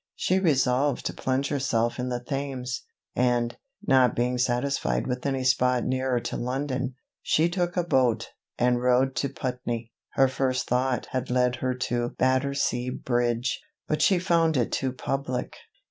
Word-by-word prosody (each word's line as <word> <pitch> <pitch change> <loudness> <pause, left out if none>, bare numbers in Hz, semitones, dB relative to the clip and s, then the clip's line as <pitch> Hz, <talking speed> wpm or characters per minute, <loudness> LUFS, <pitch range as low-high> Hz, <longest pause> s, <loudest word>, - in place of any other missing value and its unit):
She 185 +1 +1
resolved 135 -5 +2
to - - -1
plunge 130 +1 -1
herself 120 -5 0
in 125 0 -2
the 125 -1 -2
Thames; 130 -1 -4 0.3
and, 120 -1 +1 0.3
not 130 - +4
being 125 +1 0
satisfied 125 +3 0
with 125 -1 -3
any 135 -1 -1
spot 125 -1 +3
nearer 130 -1 0
to - - -4
London, 130 0 -2 0.3
she 160 +2 +3
took 175 0 -2
a 175 - +3
boat, 130 -8 +1 0.3
and 125 0 +2
rowed 125 +1 +3
to 140 - 0
Putney. 125 -3 -4 0.2
Her 135 - +5
first 130 -1 -1
thought 125 +1 0
had 130 -1 -2
led 125 0 +2
her 130 0 -1
to 120 -1 -1
Battersea 130 -1 +1
bridge, 120 -1 -1 0.3
but 155 0 0
she 185 +4 +5
found 170 -4 +2
it 120 - 0
too 130 -1 0
public. 130 0 -3
130 Hz, 155 wpm, -26 LUFS, 125-135 Hz, 0.3 s, Her